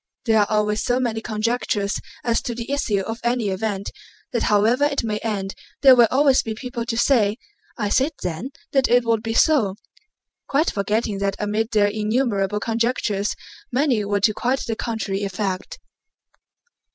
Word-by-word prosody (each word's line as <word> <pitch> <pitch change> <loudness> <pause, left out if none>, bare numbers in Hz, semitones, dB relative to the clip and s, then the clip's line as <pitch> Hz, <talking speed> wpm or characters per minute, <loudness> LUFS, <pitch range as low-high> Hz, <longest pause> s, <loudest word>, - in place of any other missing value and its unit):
There 220 -2 +4
are 205 - +2
always 210 0 +1
so 245 +1 +1
many 230 -3 -1
conjectures 215 -2 -1 0.2
as 235 -1 +1
to 240 - -4
the 235 +3 -6
issue 225 -8 0
of 225 +4 -5
any 240 -3 0
event 200 0 -3 0.4
that 235 - -1
however 220 +6 +3
it 285 -3 0
may 215 -2 -2
end 200 -3 -3 0.3
there 265 -2 +9
will 240 -2 +6
always 275 0 +4
be 220 -1 -5
people 240 -1 -5
to 230 - -2
say: 225 -5 +3 0.4
"I 210 -4 -1
said 270 +9 +2
then 180 +8 -3 0.2
that 270 -2 +2
it 245 0 +4
would 225 -1 +1
be 225 0 -3
so," 245 -10 +3 0.7
quite 295 +4 +1
forgetting 205 +1 -1
that 200 0 0
amid 215 +2 -1
their 210 -3 +3
innumerable 210 -1 0
conjectures 225 -2 -1 0.4
many 250 -4 +2
were 205 0 -1
to 215 +1 +3
quite 255 +5 -1
the 225 - -2
contrary 220 -4 -3
effect. 195 -1 -3
225 Hz, 165 wpm, -22 LUFS, 205-245 Hz, 0.7 s, there